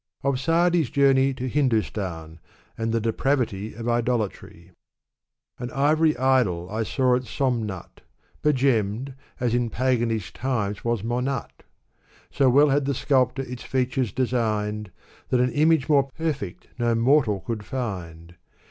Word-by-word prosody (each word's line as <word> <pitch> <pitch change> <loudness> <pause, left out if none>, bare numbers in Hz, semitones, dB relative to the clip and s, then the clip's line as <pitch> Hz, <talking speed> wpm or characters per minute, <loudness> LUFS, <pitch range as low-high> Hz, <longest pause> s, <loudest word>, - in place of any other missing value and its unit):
Of 140 -2 +1
Sa'di's 165 0 +2
Journey 135 0 +3
to 130 0 -4
Hindustan 105 - -1 0.4
and 115 0 -2
the 115 - +1
Deprav 115 +6 +1
rrv 105 +1 -8
OF 115 - -4
Idolatry. 115 -7 -2 0.9
An 120 0 -4
ivory 155 +3 +2
idol 120 -10 +2
I 110 +1 -2
saw 125 +3 +2
at 125 +1 -2
Somnat,^ 115 - -3 0.4
Begemmed, 130 -3 +1 0.3
as 120 -2 0
in 120 -1 +1
paganish 115 -4 0
times 105 -6 -2
was 115 -3 -1
Monat' 125 +2 -3 0.7
So 135 -2 +3
well 145 +4 +5
had 140 0 +2
the 140 0 0
sculptor 130 -1 +1
its 125 -1 -8
features 130 -2 -1
designed. 105 -5 -1 0.4
That 125 - +2
an 125 0 +2
image 155 -2 +3
more 140 -3 +3
perfect 145 - -4
no 120 -1 +2
mortal 115 -4 +3
could 115 -3 -4
find. 85 -10 -5
125 Hz, 135 wpm, -24 LUFS, 110-135 Hz, 0.9 s, well